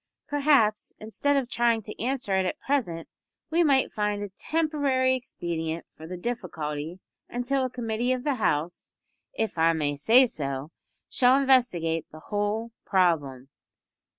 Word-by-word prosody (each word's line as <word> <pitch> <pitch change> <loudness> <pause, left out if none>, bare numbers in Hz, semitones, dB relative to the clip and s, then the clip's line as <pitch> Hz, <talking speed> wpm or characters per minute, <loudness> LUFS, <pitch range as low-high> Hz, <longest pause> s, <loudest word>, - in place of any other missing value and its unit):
Perhaps, 280 -8 +2
instead 280 +6 0
of 265 -3 0
trying 235 -2 +1
to 210 - -8
answer 250 -6 -1
it 190 -1 +2
at - - -4
present, 200 - -1 0.4
we 340 +2 +4
might 275 -4 +3
find 210 -1 -1
a 205 - -5
temporary 280 - +1
expedient 170 -9 -4
for 160 - -11
the 180 +1 -6
difficulty 170 -7 -4 0.3
until 250 +3 -1
a - - -2
Committee 240 0 -2
of 255 -1 -1
the 290 -1 +1
House 165 -2 -1 0.4
if 220 -6 -2
I 165 +1 +4
may 145 -2 -1
say 230 - +6
so 140 - -4 0.4
shall 255 +1 +4
investigate 235 - +2
the 155 - -11
whole 210 +3 -1
problem." 145 -9 +1
215 Hz, 145 wpm, -26 LUFS, 165-260 Hz, 0.4 s, say